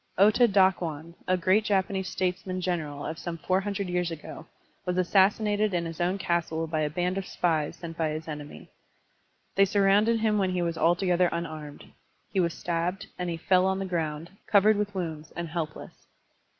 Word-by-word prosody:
Ota 215 +5 +6
Ddkwan, 175 -5 +1
a 185 - +3
great 185 +5 +3
Japanese 190 -2 0
statesman 185 0 -2
general 160 -6 -3
of 160 - -5
some 170 -1 -5
four 185 +3 +1
htmdred 200 -1 -3
years 180 -1 0
ago, 165 -2 -8 0.4
was 180 0 -2
assassinated 205 +2 +3
in 170 -1 0
his 165 0 -5
own 180 +3 +1
castle 170 -3 -1
by 160 -1 -2
a 150 - +1
band 180 +4 -1
of 195 - -7
spies 160 -4 0
sent 165 -1 -8
by 160 -1 +1
his 155 +1 -5
enemy. 150 -1 -8 0.9
They 195 - +5
surrounded 205 +3 +3
him 215 -1 +2
when 190 -1 +1
he 180 -1 0
was 170 -1 -1
altogether 175 +1 +3
tmarmed. 155 -3 -6 0.4
He 195 - +1
was 170 -2 +1
stabbed, 175 +2 -2
and 180 -1 -2
he 165 - -3
fell 185 +2 +3
on 190 0 +1
the 195 - -3
ground, 165 -2 -3 0.2
covered 210 +1 +5
with 205 0 -2
woimds 160 -4 -4
and 170 -1 -4
helpless. 160 -2 -5
180 Hz, 180 wpm, -27 LUFS, 165-195 Hz, 0.9 s, Ota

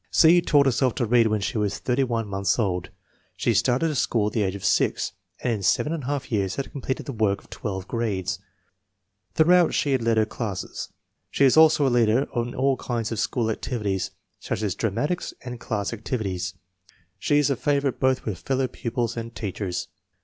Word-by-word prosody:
C. 175 +2 +6
taught 145 -4 +4
herself 130 -1 +2
to 125 - 0
read 115 0 +4
when 105 -1 0
she 105 +2 -1
was 100 -1 0
31 120 -3 0
months 100 0 0
old. 90 -6 -1 0.5
She 120 - +1
started 125 +8 +2
to - - -2
school 115 -5 +1
at 105 - -2
the 110 - +1
age 95 -1 0
of 100 - -6
6 - - +2 0.3
9 - - -1
and - - -1
in - - -8
seven 150 - +2
and 165 - -3
a 125 - -7
half 140 -2 -3
years 100 -4 0
had 140 - -4
completed 130 -1 -4
the - - -4
work 105 -5 0
of - - -23
twelve 95 -3 -5
grades. 95 -6 -2 1.0
Throughout 175 +2 +5
she 145 - +1
has 130 -2 +2
led 115 -1 +2
her 110 - +4
classes. 105 -4 -5 0.4
She 140 - +3
is 130 - +5
also 155 -2 +6
a - - +4
leader 120 +3 +3
in 120 0 -2
all 135 0 +2
kinds 120 -3 -3
of 115 - -2
school 115 -3 0
activities, 105 -5 -2 0.3
such - - -3
as 100 -3 0
dramatics 115 - -2
and 125 -1 -6
class 105 -2 -2
activities. 100 -6 -3 0.6
She 145 - +2
is 145 -1 +3
a - - +2
favorite 140 0 0
both 130 -1 +1
with 100 -6 -3
fellow 135 0 0
pupils 120 -2 -3
and 115 0 -6
teachers. 100 -3 -3
115 Hz, 200 wpm, -25 LUFS, 105-135 Hz, 1.0 s, C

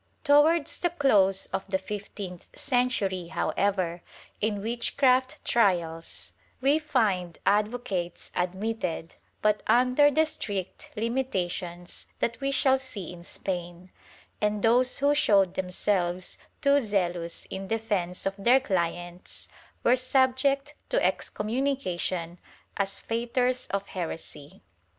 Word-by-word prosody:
^ - - -41
Towards 300 +2 +4
the 350 - +2
close 205 - +3
of 195 - -2
the 190 -1 +1
fifteenth 195 -2 -7
century, 245 -9 0
however, 185 -1 0 0.4
in 205 -2 0
witchcraft 255 +3 +1
trials, 170 -7 +1 0.3
we 280 +4 +3
find 205 - 0
advocates 205 -4 0
admitted, 180 -2 -2 0.3
but 210 -1 +3
under 255 +4 +5
the 310 +3 +3
strict 200 - -5
limitations 185 -7 -3
that 230 +1 -2
we 275 - 0
shall 265 -1 +3
see 205 -10 -6
in 175 - -11
Spain, 175 0 -5 0.5
and 210 -1 0
those 245 +2 +4
who 285 +1 +3
showed 200 -10 +4
themselves 180 -1 -1 0.2
too 280 0 +5
zealous 180 -7 -2
in 190 0 -5
defence 205 -5 -1
of 195 - +1
their 245 +6 +5
clients 175 -5 -3 0.3
were 245 - +5
subject 265 +2 +2 0.2
to - - +2
excommunication 210 -8 -1 0.4
as 195 0 +1
fautors 245 +2 0
of 200 0 -1
heresy.' 165 - -6
205 Hz, 115 wpm, -27 LUFS, 180-255 Hz, 0.5 s, under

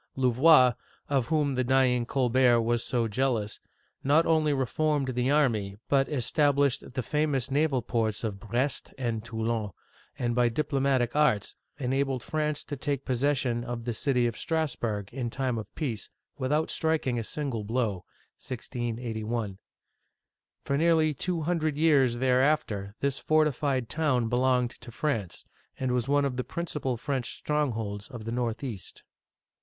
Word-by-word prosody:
Louvois, 130 +1 +5 0.4
of 135 -4 +1
whom 150 -3 +1
the 130 0 +1
dying 125 -2 +2
Colbert 125 -2 +3
was 120 0 +1
so 120 -2 0
jealous, 115 -2 -1 0.4
not 150 +4 +4
only 155 -2 +3
reformed 145 +1 0
the 125 0 0
army 115 -10 +1
but 135 -1 +3
established 140 -1 +1
the 130 - -2
famous 140 -1 0
naval 140 -3 +2
ports 110 -3 -1
of 105 -3 -3
Brest 120 +7 -2
and 115 -4 -2
Toulon 115 -1 -2
(too 100 - -13 0.4
16N'), 125 - -3
and 120 - +1
by 120 0 +3
diplomatic 135 -2 0
arts 150 -9 +2 0.2
enabled 135 -1 -1
France 150 -1 -1
to 145 - -5
take 140 0 -3
possession 130 -2 0
of 120 -1 -5
the 120 - -1
city 125 +1 +1
of 115 -2 -1
Strass 160 0 -1
burg 105 -2 -3
in 125 -2 -2
time 125 -2 -1
of 110 - -8
peace 120 -9 -3 0.3
without 150 +3 0
striking 155 -7 0
a - - -3
single 130 -3 -3
blow 110 -4 -1
(i - - -43 0.3
68 120 -2 -4
1). 110 -4 -3 1.1
For 140 0 0
nearly 160 -2 +3
two 170 +4 -2
hundred 155 -2 0
years 140 -6 +4
thereafter 125 -6 +1
this 140 -1 0
fortified 145 -5 +1
town 130 -6 +1
belonged 125 0 +2
to - - -10
France, 115 - -3 0.3
and 130 -1 0
was 125 -1 0
one 145 0 +3
of 130 -3 -2
the 125 - -1
principal 150 -7 -3
French 130 0 -3
strongholds 115 -9 -2
on 120 -4 -8
the 115 +1 -5
northeast. 115 -3 -4
130 Hz, 155 wpm, -28 LUFS, 115-145 Hz, 1.1 s, Louvois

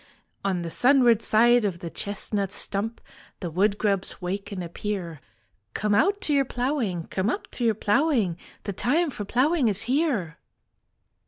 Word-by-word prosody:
On 185 -3 -1
the 165 - -5
sunward 245 - +4
side 240 +2 +4
of 195 -4 -1
the 170 -1 -7
chestnut 200 -1 -3
stump 205 +3 -2 0.4
The 175 -3 -5
woodgrubs 200 +2 0
wake 195 +3 -4
and 185 -3 -4
appear. 170 -3 -5 0.5
Come 210 -1 0
out 395 - +2
to 300 - 0
your 280 -1 +4
ploughing, 245 - -2
come 190 +3 0
up - - -4
to 245 - -4
your 225 -2 +3
ploughing, 220 - +1 0.3
The 200 - -4
time 295 - +1
for 210 -5 -6
ploughing 270 - +2
is 210 +1 +4
here." 245 - 0
210 Hz, 155 wpm, -25 LUFS, 190-250 Hz, 0.5 s, sunward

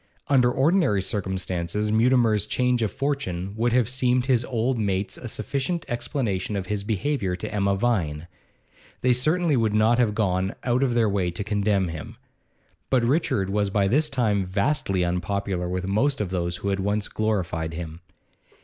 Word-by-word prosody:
Under 125 -3 +4
ordinary 145 - +2
circumstances 95 0 -2
Mutimer's 110 -2 +3
change 125 0 +1
of 110 -4 0
fortune 100 -10 -2
would 120 +2 +1
have 125 -1 +3
seemed 125 -1 +1
to 130 - -1
his 120 -2 +3
old 120 0 -1
mates 100 -2 -1
a 125 - -8
sufficient 140 - -2
explanation 120 -5 -2
of 95 -2 -2
his 100 +1 -2
behaviour 105 -2 -1
to 90 - -6
Emma 100 -1 +1
Vine; 90 -9 0 0.8
they 125 0 +4
certainly 155 +5 +2
would 110 -3 +1
not 110 +3 +4
have 110 -4 +2
gone 95 -3 0
out 125 +1 +1
of 125 -3 +1
their 115 -2 +3
way 100 -3 0
to 85 +4 -4
condemn 100 -3 +1
him. 80 -2 -8 0.7
But 130 -3 +2
Richard 115 - +1
was 100 0 +1
by 100 0 +1
this 150 +8 +2
time 110 -8 +1
vastly 95 -1 0
unpopular 90 +1 -2
with 90 +1 -3
most 135 +9 +1
of 100 -4 -2
those 85 -2 -1
who 100 - -3
had 100 0 0
once 100 +2 -1
glorified 85 -7 -2
him. 80 -1 -6
105 Hz, 170 wpm, -25 LUFS, 95-125 Hz, 0.8 s, Under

